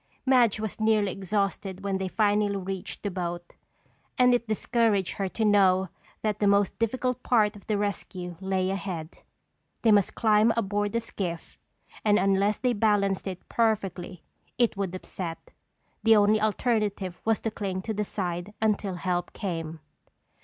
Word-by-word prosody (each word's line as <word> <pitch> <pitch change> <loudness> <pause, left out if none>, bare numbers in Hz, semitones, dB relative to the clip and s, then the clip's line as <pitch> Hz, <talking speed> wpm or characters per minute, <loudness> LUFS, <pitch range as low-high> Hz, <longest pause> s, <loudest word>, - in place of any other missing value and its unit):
Madge 245 -5 +4
was 220 -1 -4
nearly 215 -2 +2
exhausted 195 0 -2
when 195 -1 -1
they 190 - -2
finally 205 0 +1
reached 190 -1 -5
the 205 - -2
boat 175 -1 -5 0.6
and 250 -1 +5
it 240 -1 0
discouraged 215 -2 +1
her 195 -1 -1
to 220 +3 -1
know 190 -3 +4 0.3
that 210 -1 -1
the 205 - +2
most 200 0 +2
difficult 250 +2 -1
part 215 -4 +2
of 205 - -14
the 215 - +1
rescue 185 -3 -4
lay 190 -1 0
ahead. 185 -4 -5 0.6
They 225 - +5
must 205 -3 +3
climb 220 0 +4
aboard 205 -1 0
the 230 - +1
skiff, 180 -7 -5 0.4
and 210 -1 +4
unless 195 +2 +2
they 250 -1 +1
balanced 205 -3 +1
it 185 -2 -6
perfectly 195 -6 -1 0.3
it 240 -2 +2
would 195 -2 -3
upset. 175 -2 -6 0.5
The 225 0 +6
only 210 +1 +4
alternative 210 -4 0
was 225 -1 +2
to 225 - -2
cling 190 -3 -4
to 220 - -3
the 210 0 -1
side 180 0 -4
until 210 -3 0
help 175 0 -2
came. 165 -5 -4
200 Hz, 155 wpm, -27 LUFS, 190-215 Hz, 0.6 s, The